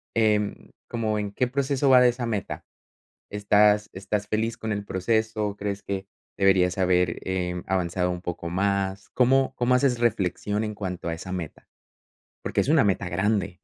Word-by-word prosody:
em, 105 -2 +1 0.2
como, 110 -2 -1
¿en 105 -1 -3
qué 125 +5 0
proceso 135 +1 0
va 125 -1 +7
de 125 - +6
esa 120 0 -3
meta? 105 -4 -4 0.7
¿Estás 105 0 +3
estás 100 +2 -3
feliz 110 +1 -1
con 110 - -5
el 100 -1 -2
proceso? 110 +1 -1
¿Crees 100 0 -4
que 95 -1 -4 0.3
deberías 95 -1 +3
haber, 90 -2 +2
em, 90 -1 -2
avanzado 90 -1 0
un 90 - -6
poco 85 -1 -5
más? 95 +1 -1
¿Cómo 130 +1 +3
cómo 125 +1 +2
haces 125 -2 +2
reflexión 105 -2 0
en 105 -1 -3
cuanto 90 -3 -4
a 85 - -1
esa 95 +3 -7
meta? 85 -5 -6 0.8
Porque - - 0
es - - -5
una 155 -3 +5
meta 100 -2 0
grande. 95 0 -1
105 Hz, 165 wpm, -25 LUFS, 95-110 Hz, 0.8 s, va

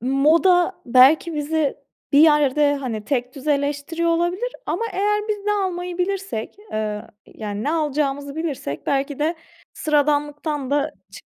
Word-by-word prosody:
moda 335 - +3
belki 275 +7 +5
bizi 300 0 0 0.4
bir 285 - +6
yerde, 295 -2 +4
hani, 230 -6 -4
tekdüzeleştiriyor 285 +5 -1
olabilir 355 +9 0
ama - - -1
eğer 420 +2 0
biz 420 -1 -1
ne 415 - +2
almayı 360 -3 -2
bilirsek, 385 - -3 0.2
eee, 215 -1 -2 0.2
yani, 210 -1 -6
ne 295 - 0
alacağımızı 285 -2 -1
bilirsek, 285 - -4
belki 275 0 -1
de 315 +3 0 0.4
sıradanlıktan 295 -1 0
da 290 0 +1
çık 195 +1 -39
295 Hz, 130 wpm, -22 LUFS, 275-340 Hz, 0.4 s, bir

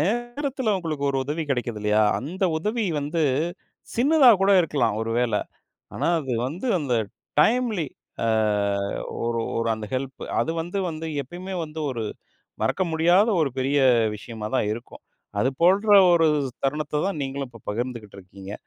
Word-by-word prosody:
நேரத்தில 240 - -1
உங்களுக்கு 160 -6 -3
ஒரு 135 - -1
உதவி 150 +4 -2
கிடைக்குது 120 -4 -1
இல்லையா? 105 +1 +3 0.2
அந்த 180 +8 -3
உதவி 215 +7 -1 0.2
வந்து 150 +4 -2 0.7
சின்னதா 270 +1 +6
கூட 195 +1 +4
இருக்கலாம், 125 -10 0
ஒரு 115 0 -2
வேளை. 125 -1 +1 0.5
ஆனா, - - -1
அது 135 -4 -4
வந்து 170 - -5
அந்த 135 -5 -1 0.5
டைம்லி, 225 -4 +2 0.4
அ 115 - +1 1.0
ஒரு 115 0 0 0.2
ஒரு 115 0 0
அந்த 110 -1 -7
ஹெல்ப். 135 +1 -4 0.2
அது - - 0
வந்து 175 +4 -4
வந்து 160 0 -6 0.2
எப்பயுமே 180 +8 -7
வந்து 155 0 -7
ஒரு 115 -4 -3 0.6
மறக்க 190 - +1
முடியாத 175 +7 +4
ஒரு 150 -3 +1
பெரிய 135 +2 +1 0.4
விஷயமா 105 +1 -7
தான் 105 - +1
இருக்கும். 120 +3 -9 0.4
அது 125 - +2
போன்ற 200 +4 +6 0.2
ஒரு 165 -1 +4 0.4
தருணத்தத்தான் 150 +4 -1
நீங்களும் 135 0 -4
இப்ப 115 -3 -15
பகிர்ந்துக்கிட்டு 115 -2 -5
இருக்கீங்க. 95 +1 -11
150 Hz, 145 wpm, -24 LUFS, 120-190 Hz, 1.0 s, சின்னதா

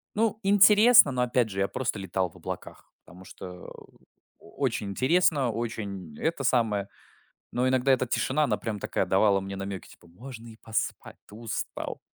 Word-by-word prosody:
ну, 220 0 0
интересно, 205 - +7
но 125 -1 0
опять 125 -2 +1
же, 95 -1 -5
я 100 - +2
просто 115 -3 -3
летал 95 -1 -2
в - - -24
облаках, - - -9
потому 90 +3 -15
что, 90 -1 -10
э, - - -14 0.4
очень 100 - -3
интересно, 140 - +2
очень 100 -8 -5
это 160 -3 -1
самое. 110 -6 +1 0.7
Но 125 +1 0
иногда 130 +1 +2
эта 130 -1 +1
тишина, 135 +5 0
она - - 0
прям 110 -2 -4
такая, - - -1
давала 100 +1 +3
мне 95 0 -6
намеки, 95 -1 -6
типа: - - -18
"Можно 115 +6 -11
и 110 - -13
поспать, 110 -1 -3
ты - - -15
устал. 115 0 -5
115 Hz, 170 wpm, -27 LUFS, 100-130 Hz, 0.7 s, интересно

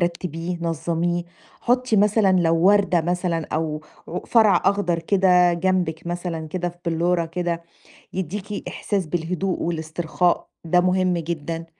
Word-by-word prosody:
رتّبيه 170 0 -2
نظّميه، 170 +1 -1 0.4
حُطّي 250 -2 +1
مثلًا 210 -1 +4
لو 165 -1 +3
وردة 190 0 +4
مثلًا 175 -1 -1
أو 155 -1 -2 0.3
ع 180 - -3
فرع 215 -6 +4
أخضر 195 -3 +2
كده 180 0 +4
جنبِك 170 -2 0
مثلًا 175 -2 -4
كده 175 +2 -2
في 175 - -13
بلُّورة 170 +1 +1
كده، 170 0 -3 0.5
يدّيكِ 195 +3 -4
إحساس 195 -4 -2
بالهدوء 175 +3 -2
والاسترخاء، 165 +1 -1 0.2
ده 175 +2 +3
مهم 185 0 +2
جدًا. 165 0 -4
175 Hz, 125 wpm, -23 LUFS, 165-185 Hz, 0.5 s, مثلًا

